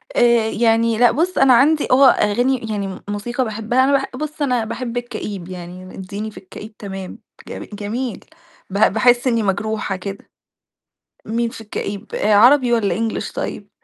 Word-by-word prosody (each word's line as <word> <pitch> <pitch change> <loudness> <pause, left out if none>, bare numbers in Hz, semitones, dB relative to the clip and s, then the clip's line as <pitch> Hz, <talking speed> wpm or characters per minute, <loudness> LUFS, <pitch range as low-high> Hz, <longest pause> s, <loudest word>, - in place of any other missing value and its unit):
آآ 235 -2 +4
يعني، 225 0 +2
لأ 240 -1 +5
بُصّ 355 +5 -1
أنا 270 -2 +6
عندي 295 +5 +4
هو 270 +2 +6
أغاني 245 +3 +3
يعني 200 -2 -2
م 190 - -8
موسيقى 240 +5 -2
باحبها 225 +3 0
أنا 270 - +2
باح 270 -1 +2
بُص 305 +2 -6
أنا 250 -5 +1
باحب 235 +1 -5
الكئيب 205 -6 -5
يعني 180 +1 -9
اديني 200 +3 -6
في - - -16
الكئيب 210 +3 -11
تمام، 195 -2 -7 0.3
جم - - -7
جميل، 220 +5 -4 0.4
ب 195 - -3 0.2
باحس 240 +3 +3
إني 230 -3 +1
مجروحة 205 +1 -1
كده. 195 +2 -8 1.0
مين 235 +2 -1
في 230 - -10
الكئيب، 210 -1 -6
آآ 210 +1 +2
عربي 245 +4 +6
والّا 225 -4 +1 0.3
English - - -6
طيب؟ - - -5
225 Hz, 165 wpm, -19 LUFS, 205-245 Hz, 1.0 s, أنا